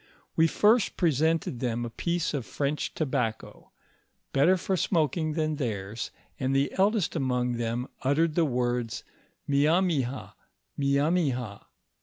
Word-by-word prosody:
We 160 - +5
first 215 +6 +3
presented 160 -4 +1
them 120 -1 -1
a 115 - -6
piece 170 +5 -1
of 140 -4 -2
French 145 +1 -2
tobacco, 125 -7 -3 0.6
better 165 +7 +4
for 190 +2 -1
smoking 160 -3 0
than 155 -1 -1
theirs, 110 -4 -3 0.3
and 135 +1 0
the 140 +1 +2
eldest 200 -2 +2
among 125 -4 0
them 120 +2 -2
uttered 155 +4 +2
the 170 - +3
words 120 -3 -1 0.4
Miamiha, 145 -2 +1 0.4
Hiamiha. 140 - 0
140 Hz, 120 wpm, -28 LUFS, 125-165 Hz, 0.6 s, We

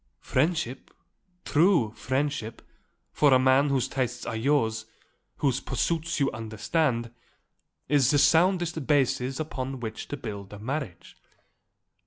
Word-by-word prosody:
Friendship, 140 -2 -1 0.6
true 160 - +3
friendship, 130 -1 -3 0.5
for 145 -2 +3
a - - +7
man 130 +2 +4
whose 135 -3 +1
tastes 130 -3 -3
are - - -4
yours, 110 -3 0 0.5
whose 135 -3 +1
pursuits 170 0 -2
you 140 -1 +2
understand, 115 +3 -1 0.8
is 140 -4 +3
the 145 - +3
soundest 170 -1 +3
basis 135 -2 +1
upon 135 -4 -4
which 110 -2 -6
to 145 - -5
build 100 -5 -7
a - - -8
marriage." 115 - -5
135 Hz, 120 wpm, -27 LUFS, 115-150 Hz, 0.8 s, a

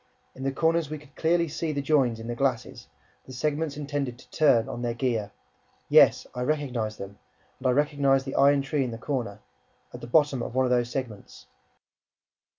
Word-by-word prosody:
In 130 - -12
the 135 0 -1
corners, 165 +1 +1
we 155 - -4
could 145 -1 -18
clearly 170 +1 +1
see 160 +1 -3
the 145 - -2
"joins" 135 -6 +2
in 115 - -8
the 120 - -3
glasses, 125 -1 -2 0.4
the - - -10
segments 150 +2 -2
intended 145 -4 -3
to - - -18
turn 130 -7 +3
on 120 -3 -6
their 120 -1 -2
gear; 115 -4 -1 0.6
yes, - - +6
I 125 - -5
recognized 125 -6 -2
them 100 +1 -9 0.4
and 130 - -1
I - - +4
recognized 140 -1 +2
the 135 - -5
iron 140 0 +4
tree 135 +1 0
in 125 - -3
the 115 - -6
corner, 115 -6 -4 0.5
at - - -9
the - - -7
bottom 145 -1 +2
of - - -6
one 130 0 +3
of 125 - -1
those 120 -1 +2
segments 120 -5 -7
135 Hz, 195 wpm, -26 LUFS, 120-145 Hz, 0.6 s, yes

